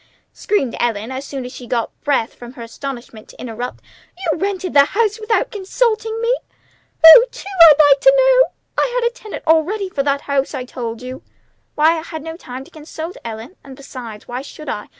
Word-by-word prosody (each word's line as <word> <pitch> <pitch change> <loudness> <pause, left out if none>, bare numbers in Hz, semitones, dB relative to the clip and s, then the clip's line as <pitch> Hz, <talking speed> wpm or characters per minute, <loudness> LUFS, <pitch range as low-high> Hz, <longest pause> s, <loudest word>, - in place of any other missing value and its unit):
screamed 335 - -1
Ellen 230 0 -2
as 260 +2 -5
soon 270 -3 -6
as 250 - -8
she 245 - -10
got 235 -1 -2
breath 275 -6 0
from 240 0 -12
her 240 - -9
astonishment 235 -2 -8
to - - -16
interrupt. 245 +1 -6 0.3
"You've 335 -4 -2
rented 380 -2 -2
the 280 -1 +7
house 425 +6 0
without 445 +3 0
consulting 440 +2 -1
me? 470 +2 +1 0.7
Who 325 +9 +11
to, 475 - -12 0.2
I'd 300 0 +6
like 280 - +4
to - - +6
know? - - +5 0.3
I - - +1
had 475 - +1
a 475 - -3
tenant 435 -4 -9
already 350 +6 +1
for 285 - -2
that 280 0 0
house, 275 -1 -1
I 255 - -5
told 235 -2 -6
you." 255 +1 -7 0.5
"Why, 320 +2 +3
I - - -7
had 315 -2 -8
no 325 0 -7
time 260 -6 -9
to - - -19
consult 315 +2 -8
you, - - -15
Ellen; 230 - -8
and, 270 -1 -12
besides, 250 -6 -10
why 245 +1 -5
should 290 +1 -10
I? 210 - -5
290 Hz, 205 wpm, -18 LUFS, 250-390 Hz, 0.7 s, Who